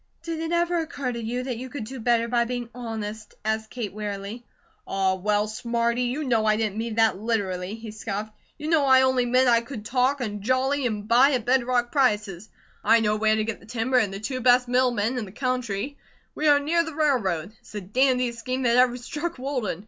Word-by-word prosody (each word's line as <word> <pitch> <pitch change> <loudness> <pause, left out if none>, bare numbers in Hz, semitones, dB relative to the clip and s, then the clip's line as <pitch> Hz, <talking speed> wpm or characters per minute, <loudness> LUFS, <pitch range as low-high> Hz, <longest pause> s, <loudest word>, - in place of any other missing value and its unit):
"Did 330 -1 -4
it 325 0 -3
ever 345 0 +1
occur 285 -5 -3
to 235 -1 -5
you 245 +3 -2
that 255 -3 -3
you 255 +2 -7
could 250 -2 -5
do 260 +4 -7
better 235 0 +2
by 240 0 +2
being 240 -1 -4
honest?" 220 -3 -6
asked 220 0 -1
Kate, 230 -6 -5
wearily. 205 +2 -5 0.4
"Aw, 190 -1 +1
well, 205 +2 0
Smarty! 235 +1 -1
you 260 +6 -2
know 235 -5 +1
I 215 0 +3
didn't 215 -2 -1
mean 225 -1 -3
that 225 -4 +3
literally!" 200 -3 -2
he 225 -1 -8
scoffed. 215 0 -5 0.3
"You 300 0 -6
know 315 -3 +3
I 260 0 +6
only 260 -2 +2
meant 255 +2 +3
I 235 -1 +5
could 230 -3 -8
talk, 260 +3 +1
and 210 -5 -4
jolly, 255 +4 +1
and 210 -2 -4
buy 255 +5 +5
at 245 -4 -1
bed 255 0 +3
rock 245 -1 0
prices; 210 - 0 0.3
I 230 - +5
know 210 -1 +1
where 215 0 +2
to 220 - 0
get 225 0 -4
the - - -18
timber, 245 +2 +1
and 205 -5 0
the 195 - -6
two 255 +4 -4
best 250 0 +4
mill 250 +1 +3
men 240 +2 -1
in 220 - -4
the 190 - -11
country; 255 +1 -3 0.3
we 305 - -1
are 290 -1 +6
near 330 +4 +1
the 320 -2 -7
railroad; 215 - 0
it's - - -18
the 210 - -4
dandiest 250 +3 +1
scheme 255 +3 -3
that 235 0 +3
ever 250 -1 +4
struck 300 +7 -5
Walden. 250 - -3
240 Hz, 225 wpm, -25 LUFS, 215-255 Hz, 0.4 s, I